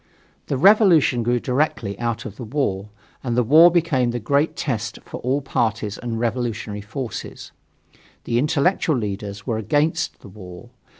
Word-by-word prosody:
The 140 - -1
revolution 175 - +5
grew 120 +1 +1
directly 125 -6 -1
out 120 -2 -2
of 100 - -7
the - - -7
war, 105 -6 -2 0.3
and 120 -2 -2
the 125 - +4
war 155 +8 +7
became 165 -8 +1
the 120 0 -2
great 140 +7 0
test 115 -5 -3
for - - -8
all 135 +4 0
parties 110 -5 -2
and 115 -2 -4
revolutionary 115 -3 -3
forces. 110 +2 -7 0.7
The 120 0 0
intellectual 150 +2 +1
leaders 100 -2 -5
were 110 -2 -1
"against 155 +8 0
the - - -12
war." 95 +3 -12
120 Hz, 155 wpm, -22 LUFS, 110-145 Hz, 0.7 s, war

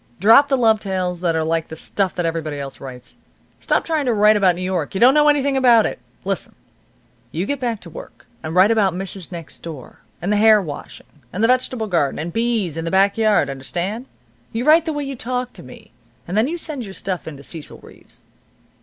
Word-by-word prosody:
Drop 225 +8 +6
the 270 - +1
love 225 -3 +3
tales 185 -3 -3
that 170 -2 +1
are 160 - +1
like 160 0 -1
the 160 - -8
stuff 190 +3 -2
that 175 - -1
everybody 160 -3 -3
else 140 -1 -7
writes. 130 -2 -9 0.4
Stop - - 0
trying 315 -3 -1
to 240 - +2
write 210 +1 +5
about 190 -4 +3
New 180 - -5
York. 185 -3 -2
You - - -1
don't 250 +4 +7
know 300 0 +4
anything 280 -2 +2
about 240 -4 +5
it. - - -3 0.3
Listen. - - -3 0.8
You 170 +4 -2
get 285 +5 -2
back 235 -4 -2
to 170 - -11
work, - - -12 0.2
and 155 +2 -5
write 190 +4 +6
about 200 -5 +2
Mrs. 190 -1 -7
Next 170 -2 -8
Door, 155 -7 -10 0.2
and 195 +5 -1
the - - +2
hair 215 0 +6
washing, 155 -7 -8 0.3
and 200 +5 -2
the - - +5
vegetable 255 -2 +1
garden, 170 -9 0
and 165 +2 -5
bees, 225 -8 0
and 165 0 -3
the - - 0
back 195 +2 +3
yard, 215 -9 +2
understand? 175 - -4 0.4
You 230 +3 -3
write 320 +2 +5
the 320 - -2
way 290 -1 -3
you 275 -1 -5
talked 250 +1 -4
to - - -10
me, - - -14 0.4
and 180 - -4
then 220 +4 +3
you 340 +4 -3
send 305 -6 -5
your 195 -3 -9
stuff 185 -4 -4
in 155 -3 -7
to 140 - -13
Cecil 160 0 -7
Reeves." - - -12
200 Hz, 225 wpm, -20 LUFS, 170-240 Hz, 0.8 s, don't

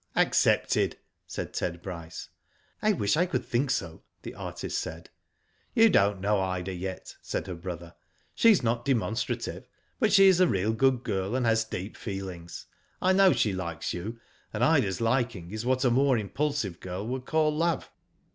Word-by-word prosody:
" - - -34
Accepted," - - +2 0.3
said - - -5
Ted 85 0 -3
Bryce. 85 -4 -7 0.5
"I 215 - +3
wish 105 - +1
I 175 +4 +2
could 180 - -2
think 130 +3 0
so," 85 -8 -2 0.2
the - - -7
artist - - -4
said. 80 +1 -7 0.6
"You 225 -2 +6
don't 100 - +3
know 100 +1 +1
Ida 95 0 -2
yet," 95 +1 -6
said - - -3
her 95 - -5
brother. 85 -1 -7 0.4
"She 230 - +5
is 200 - +5
not 120 +1 0
demonstrative, 115 -5 -2 0.3
but 215 - +3
she 195 0 +7
is 185 -2 +5
a 185 - +6
real 105 +1 +1
good 130 +1 +2
girl, 95 +4 -2
and 130 -2 0
has 115 0 +3
deep 100 -1 -6
feelings. 95 -5 -7 0.3
I 185 +1 +3
know 190 0 +6
she 105 -10 +1
likes 85 -4 -4
you, 110 +7 -5 0.3
and - - -1
Ida's 95 +2 +2
liking 115 -7 0
is 110 +3 -4
what 130 +1 +2
a 125 - +4
more 135 +1 +3
impulsive 110 - -2
girl 95 +2 -5
would 130 +1 -4
call 155 -1 +2
love." 165 +1 0
110 Hz, 175 wpm, -28 LUFS, 95-135 Hz, 0.6 s, she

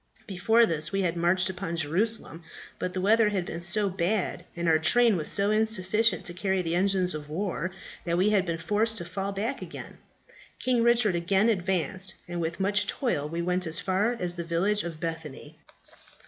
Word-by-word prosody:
Before 220 +5 +3
this 160 -4 -2
we 195 0 0
had 175 -2 0
marched 175 +2 +2
upon 185 -2 -4
Jerusalem. 170 +3 0 0.4
But 180 - -3
the 185 - -1
weather 215 +2 +4
had 190 -4 -2
been 170 - -6
so 200 +4 +2
bad, 190 +2 -1
and 170 0 -2
our 160 -1 +4
train 230 +7 +4
was 160 -4 -1
so 200 +1 +2
insufficient 215 -1 +1
to 175 - -3
carry 190 0 -1
the 165 -1 -2
engines 185 0 +1
of 150 -1 -7
war, 180 0 -2 0.3
that 170 0 -1
we 195 +4 +3
had 200 -3 +3
been 170 -2 -3
forced 210 +6 0
to 170 - -4
fall 195 +3 -4
back 220 +7 -3
again. - - -9 0.6
King 250 -2 +1
Richard 235 -3 +3
again 190 +5 +2
advanced, 185 -1 -1
and 175 0 -4
with 165 +2 -3
much 200 +2 +1
toil 150 - -1
we 170 +2 -3
went 180 0 -1
as 160 +1 +2
far 190 +5 +1
as 175 -1 -1
the 170 -1 -5
village 185 +5 0
of 165 -2 -6
Bethany." 160 -2 -6
185 Hz, 190 wpm, -27 LUFS, 170-210 Hz, 0.6 s, weather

